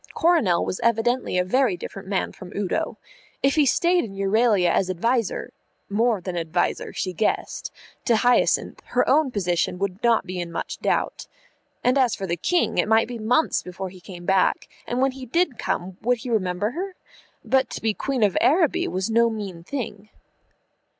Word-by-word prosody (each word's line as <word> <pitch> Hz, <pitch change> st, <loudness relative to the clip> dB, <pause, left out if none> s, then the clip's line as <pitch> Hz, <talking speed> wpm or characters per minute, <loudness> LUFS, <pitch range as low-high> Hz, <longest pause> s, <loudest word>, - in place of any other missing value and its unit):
Coronel 320 Hz, -, +3 dB
was 185 Hz, -, -3 dB
evidently 235 Hz, -2 st, +1 dB
a 180 Hz, -, +3 dB
very 235 Hz, 0 st, +1 dB
different 190 Hz, +2 st, -8 dB
man 195 Hz, -1 st, -1 dB
from 180 Hz, -, -11 dB
Udo. 200 Hz, -3 st, -2 dB, 0.5 s
If 275 Hz, 0 st, +4 dB
he 300 Hz, -3 st, +3 dB
stayed 350 Hz, +6 st, +3 dB
in 200 Hz, -5 st, -7 dB
Euralia 195 Hz, -2 st, +3 dB
as 185 Hz, -, +1 dB
adviser 230 Hz, +4 st, -1 dB, 0.4 s
more 220 Hz, +1 st, +2 dB
than 185 Hz, 0 st, -5 dB
adviser 170 Hz, +1 st, -1 dB
she 185 Hz, -, -3 dB
guessed 215 Hz, +4 st, -1 dB, 0.3 s
to 235 Hz, -, +4 dB
Hyacinth, 245 Hz, +2 st, +2 dB
her -, -, +1 dB
own 310 Hz, -3 st, +4 dB
position 180 Hz, -5 st, 0 dB
would 195 Hz, 0 st, -3 dB
not 235 Hz, -3 st, +3 dB
be 185 Hz, -1 st, -5 dB
in 170 Hz, -1 st, -4 dB
much -, -, -5 dB
doubt. -, -, -1 dB, 0.6 s
And 255 Hz, +3 st, +3 dB
as 250 Hz, -4 st, +3 dB
for 195 Hz, -, -5 dB
the 170 Hz, -2 st, -1 dB
King, 345 Hz, -, +1 dB
it -, -, +2 dB
might 220 Hz, +1 st, +4 dB
be 240 Hz, -1 st, -6 dB
months 245 Hz, +9 st, +2 dB
before 185 Hz, +1 st, -6 dB
he 185 Hz, 0 st, -14 dB
came 175 Hz, -1 st, -10 dB
back, 190 Hz, 0 st, +2 dB, 0.2 s
and 245 Hz, +1 st, -1 dB
when 270 Hz, -, +3 dB
he 260 Hz, -1 st, -9 dB
did 305 Hz, -1 st, 0 dB
come 180 Hz, +1 st, -3 dB
would 245 Hz, +2 st, +2 dB
he 245 Hz, +1 st, -6 dB
remember 195 Hz, -1 st, 0 dB
her? 370 Hz, +6 st, -5 dB, 0.5 s
But 260 Hz, +3 st, +2 dB
to -, -, -5 dB
be 220 Hz, -1 st, 0 dB
Queen 265 Hz, +1 st, -1 dB
of 200 Hz, -3 st, +2 dB
Araby 320 Hz, +1 st, +3 dB
was 185 Hz, +5 st, -2 dB
no 230 Hz, +1 st, +4 dB
mean 200 Hz, -6 st, -6 dB
thing. 215 Hz, -3 st, -6 dB
215 Hz, 185 wpm, -24 LUFS, 185-250 Hz, 0.6 s, If